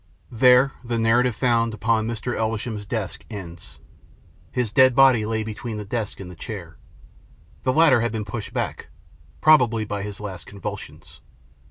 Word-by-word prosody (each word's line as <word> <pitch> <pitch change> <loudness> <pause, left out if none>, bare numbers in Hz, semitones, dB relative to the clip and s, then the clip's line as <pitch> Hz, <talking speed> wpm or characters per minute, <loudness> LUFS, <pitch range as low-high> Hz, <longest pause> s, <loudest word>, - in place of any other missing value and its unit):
There 125 +3 +5
the 120 -1 -2
narrative 115 +1 +2
found 115 -2 +1
upon 110 +1 +1
Mr. 115 +1 -3
Elvesham's 110 -1 -3
desk 105 -4 -4
ends. 85 -6 -9 0.7
His 125 -4 -1
dead 130 +2 +5
body 130 -5 +5
lay 110 0 -1
between 110 +1 -6
the 105 - -6
desk 110 0 -4
and 95 - -7
the - - -11
chair. 85 -2 -8 0.8
The 130 - +1
latter 145 -4 +5
had 120 - 0
been 110 -1 -4
pushed 105 +1 -6
back, - - -4 0.5
probably 120 -8 +4
by 105 -1 -4
his 100 -1 -6
last 95 -5 -7
convulsions. 100 -1 -8
110 Hz, 155 wpm, -23 LUFS, 105-120 Hz, 0.8 s, There